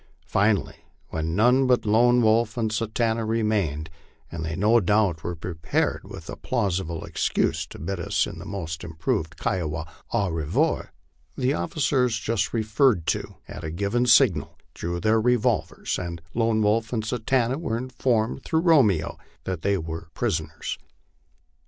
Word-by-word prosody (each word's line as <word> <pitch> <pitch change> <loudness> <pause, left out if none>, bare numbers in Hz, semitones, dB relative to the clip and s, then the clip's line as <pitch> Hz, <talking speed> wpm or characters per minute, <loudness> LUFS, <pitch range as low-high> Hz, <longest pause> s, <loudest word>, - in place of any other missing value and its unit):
Finally, 100 0 +1 0.3
when 80 +1 -2
none 125 +6 +4
but 125 -2 +3
Lone 120 +3 +4
Wolf 110 +1 +3
and 110 -2 0
Satanta 115 +1 0
remained, 105 -9 0 0.4
and 85 -1 -5
they 80 0 -3
no 110 +6 +4
doubt 100 -5 +2
were 85 - -3
prepared 80 -1 -1
with - - -10
a - - -5
plausible 95 -8 -2
excuse - - 0
to - - -11
bid 90 +4 -4
us 85 - +1
in - - -8
the - - -9
most 85 -6 -5
improved 80 -1 -2
Kiowa 80 -4 -2 0.3
au 100 -3 +1
revoir, 80 -1 0 0.5
the 130 +1 +1
officers 125 - +1
just 110 -2 -1
referred 110 - +2
to, - - -2
at - - -8
a 80 - -3
given 100 +9 0
signal, 120 - +4 0.2
drew 85 +1 -3
their 110 +3 +3
revolvers, 125 -1 0
and 85 -2 -5
Lone 115 -2 +2
Wolf 110 +2 +1
and 110 -3 -1
Satanta 125 +3 0
were 115 -9 -2
informed 125 -1 -1
through 160 - +1
Romeo 120 - +3 0.2
that 90 -4 -4
they 100 +2 +1
were 80 -1 -6
prisoners. 80 -1 -2
105 Hz, 150 wpm, -25 LUFS, 85-115 Hz, 0.5 s, none